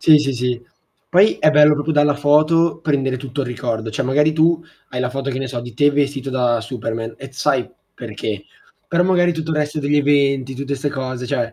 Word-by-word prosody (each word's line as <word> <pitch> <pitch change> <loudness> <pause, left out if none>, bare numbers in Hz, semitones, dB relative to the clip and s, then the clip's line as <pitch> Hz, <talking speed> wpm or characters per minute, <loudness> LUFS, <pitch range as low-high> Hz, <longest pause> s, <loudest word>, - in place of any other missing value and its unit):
Sì, 155 -2 +6
sì, 140 -2 -1
sì. 125 -1 -2 0.4
Poi, 190 +5 +4
è 155 - +4
bello 150 0 +6
proprio 145 +2 -2
dalla 145 -1 +3
foto, 155 +3 +3
prendere 135 -4 0
tutto 135 +2 -5
il 130 - -2
ricordo. 115 -3 -3
Cioè 130 +4 -2
magari 150 +4 +2
tu 165 +1 +2 0.3
hai 125 - -3
la 125 0 -1
foto, 135 +1 -4
che 130 - -3
ne 135 - -4
so, 120 -3 -4
di 120 -1 -10
te 145 +4 +4
vestito 140 -1 -1
da 125 -3 +1
Superman, 115 -1 -5
e 135 - -9
t - - -22
sai 130 -1 0 0.3
perché. 105 -3 -5 0.4
Però 170 +1 +1
magari 175 -1 +3
tutto 160 0 -4
il 155 - -1
resto 150 0 -1
degli 145 +1 +1
eventi, 140 -2 +2
tutte 140 +1 -4
ste 145 +2 -2
cose 130 -2 -5
cioè, 120 -1 -2
140 Hz, 220 wpm, -19 LUFS, 125-150 Hz, 0.4 s, Sì